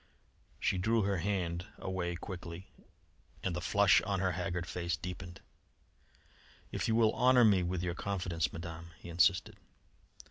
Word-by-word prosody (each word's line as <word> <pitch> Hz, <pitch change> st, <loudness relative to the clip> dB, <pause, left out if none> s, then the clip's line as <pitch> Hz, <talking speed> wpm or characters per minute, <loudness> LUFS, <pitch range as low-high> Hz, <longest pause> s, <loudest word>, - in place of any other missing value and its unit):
She 95 Hz, -, +1 dB
drew 110 Hz, +3 st, +2 dB
her 100 Hz, 0 st, +1 dB
hand 90 Hz, -1 st, -2 dB
away 90 Hz, -2 st, -3 dB
quickly, 90 Hz, -1 st, -8 dB, 0.7 s
and 90 Hz, -3 st, -1 dB
the 85 Hz, -, -3 dB
flush 100 Hz, +2 st, +5 dB
on 100 Hz, 0 st, -1 dB
her 95 Hz, 0 st, +1 dB
haggard 90 Hz, 0 st, -2 dB
face 85 Hz, 0 st, -2 dB
deepened. 90 Hz, 0 st, -7 dB, 1.3 s
"If -, -, -2 dB
you 110 Hz, -, +2 dB
will 110 Hz, -2 st, +4 dB
honour 125 Hz, -1 st, +5 dB
me 100 Hz, -4 st, +5 dB
with 90 Hz, 0 st, -2 dB
your 90 Hz, -1 st, -1 dB
confidence, 90 Hz, -4 st, -2 dB
Madame," 85 Hz, 0 st, -8 dB
he 85 Hz, -, -11 dB
insisted. 90 Hz, +3 st, +2 dB
90 Hz, 145 wpm, -33 LUFS, 85-100 Hz, 1.3 s, flush